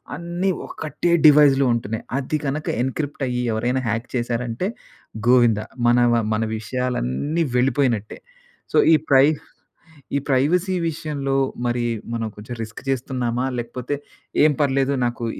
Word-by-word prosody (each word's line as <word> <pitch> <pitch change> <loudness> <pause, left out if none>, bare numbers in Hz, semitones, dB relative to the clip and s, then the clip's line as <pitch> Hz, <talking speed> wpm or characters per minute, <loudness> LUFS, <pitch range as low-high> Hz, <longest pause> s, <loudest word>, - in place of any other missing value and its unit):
అన్నీ 175 +2 -2 0.2
ఒక్కటే 155 +2 -2
డివైస్‌లో 145 -2 +7
ఉంటున్నాయి. 110 -1 -3
అది 140 +3 -1
గనక 145 +3 -2
ఎన్‌క్రి‌ప్ట్ 140 +2 -3
అయ్యి 125 0 -1
ఎవరైనా 120 +4 0
హ్యాక్ 115 +2 -1
చేశారంటే 120 +6 -2 0.6
గోవిందా! 120 -4 +4 0.2
మనవ 120 0 +4 0.2
మన 110 +1 0
విషయాలన్నీ 125 - -1
వెళ్ళిపోయినట్టే. 125 -4 +1 0.6
సో - - +3 0.2
ఈ - - +8
ప్రైవ్ 140 +3 +5 0.8
ఈ - - +1
ప్రైవసీ 170 +8 +2
విషయంలో 145 -3 -3 0.3
మరి 120 0 0 0.3
మనం 115 -1 -2
కొంచెం 110 +4 -7
రిస్క్ 110 +1 -9
చేస్తున్నామా? 125 -1 -1
లేకపోతే 125 +4 -4 0.5
ఏం 155 - +4
పర్లేదు 135 0 +2
నాకు 120 0 -3
130 Hz, 120 wpm, -22 LUFS, 120-145 Hz, 0.8 s, ఈ